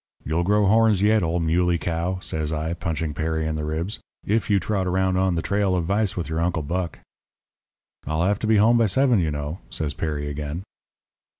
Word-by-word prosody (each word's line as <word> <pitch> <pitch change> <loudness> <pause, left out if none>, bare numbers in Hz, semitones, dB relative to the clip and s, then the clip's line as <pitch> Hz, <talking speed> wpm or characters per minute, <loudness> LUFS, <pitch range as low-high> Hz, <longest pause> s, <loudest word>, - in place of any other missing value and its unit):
You'll 80 +4 0
grow 105 +3 +3
horns 110 -1 +4
yet, 110 +1 +4
old 85 0 0
muley 85 +2 +2
cow,' 85 +3 -2
says 80 -3 -2
I, 80 +1 -2
punching 80 -2 -3
Perry 80 +1 -1
in 80 - -1
the 75 0 -3
ribs, 80 +6 -3 0.3
'if 105 -3 0
you 100 -1 +4
trot 95 0 -1
around 95 0 +1
on 95 -1 +2
the 80 - -1
trail 100 -2 +1
of 85 -2 0
vice 100 +2 0
with 85 -4 -2
your 80 +1 -2
Uncle 85 -2 0
Buck.' 85 +2 -3 1.1
"'I'll 80 +3 0
have 100 +2 +1
to 110 - -2
be 110 -1 +4
home 115 +3 +5
by 115 - +4
seven, 125 +2 +3
you 80 -3 +1
know,' 75 +3 -4
says 75 +5 -2
Perry 75 -2 -3
again. 75 +4 -4
85 Hz, 205 wpm, -24 LUFS, 80-100 Hz, 1.1 s, home